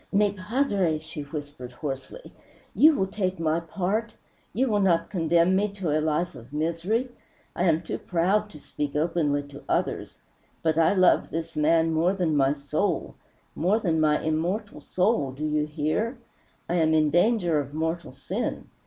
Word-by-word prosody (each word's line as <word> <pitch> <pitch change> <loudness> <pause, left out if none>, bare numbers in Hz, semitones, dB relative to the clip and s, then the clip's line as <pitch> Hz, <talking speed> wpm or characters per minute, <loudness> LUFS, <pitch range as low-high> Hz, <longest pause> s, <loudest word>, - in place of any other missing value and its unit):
"Mi 205 0 +3
padre!" 200 - 0
she 155 0 -8
whispered 145 -3 -7
hoarsely, 145 - -7 0.4
"you 310 0 +6
will 190 - +1
take 190 -2 -2
my 160 0 +1
part! 200 +7 -2 0.4
You 260 +4 +1
will 210 -3 +1
not 170 -4 +2
condemn 170 0 +3
me 205 +2 +2
to 180 -7 -1
a 155 - +2
life 160 +3 0
of 120 +3 -13
misery! 170 - -1 0.5
I 180 - 0
am 165 -1 +2
too - - -4
proud 195 +5 +1
to 155 - -12
speak 145 0 -5
openly 150 -2 +1
to 140 0 -11
others - - -1 0.5
but 160 -1 +2
I 165 +4 +3
love 185 -2 +4
this 165 0 -5
man 160 +2 +3
more 170 +4 +2
than 175 -5 0
my 140 0 +3
soul 150 +6 -2 0.4
more 185 +7 +2
than 165 -7 0
my 150 -1 +3
immortal 175 +7 -2
soul. 180 - 0
Do 150 +4 -4
you 150 0 0
hear? 155 - -1 0.5
I 175 - 0
am 160 -1 +3
in 155 -1 +3
danger 175 -2 +3
of 145 +1 -5
mortal 160 +1 -2
sin. 135 +1 -4
165 Hz, 170 wpm, -26 LUFS, 150-190 Hz, 0.5 s, you